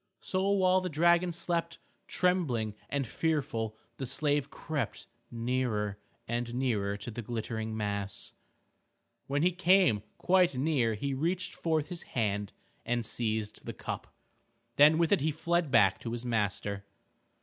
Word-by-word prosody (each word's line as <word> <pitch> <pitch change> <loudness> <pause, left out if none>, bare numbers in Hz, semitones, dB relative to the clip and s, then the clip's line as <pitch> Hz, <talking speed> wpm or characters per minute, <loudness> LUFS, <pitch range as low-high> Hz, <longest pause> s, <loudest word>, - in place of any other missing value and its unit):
So 190 +1 0
while 185 -2 +4
the 185 - -2
dragon 170 +3 +3
slept, 170 0 -2 0.3
trembling 145 - +1 0.2
and 140 -1 -1
fearful 135 -6 -1 0.2
the 135 - -4
slave 145 +1 +1
crept 135 -9 -4 0.2
nearer 115 -4 -1 0.3
and 120 +1 -2
nearer 105 -6 0
to 105 +4 -7
the 120 - -5
glittering 110 -1 -4
mass. 100 -2 -3 0.9
When 145 +2 +1
he 180 - +4
came 180 - +4 0.2
quite 180 -6 +3
near 130 -6 +2
he 140 +6 -2
reached 175 +7 -1
forth 160 -2 0
his 175 -2 -5 0.2
hand 105 -3 0 0.3
and 120 -1 -1
seized 110 -2 -1
the - - -3
cup. - - -6 0.6
Then 150 +2 +7
with 165 -1 +2
it 200 - +4
he 155 - +2
fled 165 +1 0
back 110 -6 +5
to 115 - -5
his 120 +1 -4
master. 100 -3 -1
130 Hz, 140 wpm, -31 LUFS, 110-165 Hz, 0.9 s, Then